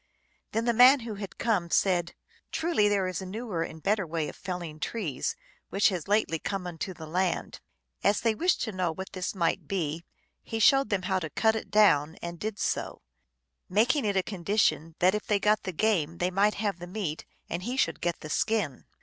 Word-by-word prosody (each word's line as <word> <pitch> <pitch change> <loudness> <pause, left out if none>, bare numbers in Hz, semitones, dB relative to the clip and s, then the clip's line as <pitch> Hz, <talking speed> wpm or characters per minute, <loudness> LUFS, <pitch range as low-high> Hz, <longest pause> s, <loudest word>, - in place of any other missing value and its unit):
Then 225 +1 -1
the 235 - +3
man 255 +3 +7
who 225 -1 -5
had 200 - -7
come 200 -7 0
said, 175 -1 +1 0.2
" - - -33
Truly 315 -11 +2
there 200 -2 +2
is 185 0 -3
a - - -6
newer 205 -3 -4
and 160 -1 -5
better 200 -2 +1
way 160 -1 -2
of - - -9
felling 175 -4 -6
trees, 170 - -2 0.3
which 200 - +3
has 180 -5 -4
lately 205 -6 +1
come 195 +1 -3
into 180 +2 -5
the 160 - -8
land." 180 +3 -1 0.4
As 205 - +3
they 230 -1 +2
wished 355 +11 +1
to 220 - -3
know 185 -3 -1
what 190 +4 -7
this 185 +1 -3
might 170 -3 0
be, 165 -4 -2 0.4
he 225 - -5
showed 270 +5 +5
them 195 -3 0
how 190 0 +1
to 160 -3 -5
cut 220 +7 +2
it 220 - -5
down, 160 -7 +4
and 170 0 -6
did 215 -1 -3
so; - - -2 0.7
making 240 +8 +3
it 200 -2 0
a 190 - +3
condition 180 -4 0
that 185 +1 +4
if 210 - -3
they 205 -1 +2
got 210 +1 +3
the 185 - -2
game 170 -4 +1
they 180 +1 0
might 200 +3 +3
have 200 -4 -2
the 175 - -7
meat 180 -5 -4 0.2
and 175 - -3
he 245 +7 -3
should - - +1
get 175 -1 -1
the 155 - -7
skin. 205 - 0
190 Hz, 210 wpm, -28 LUFS, 170-215 Hz, 0.7 s, man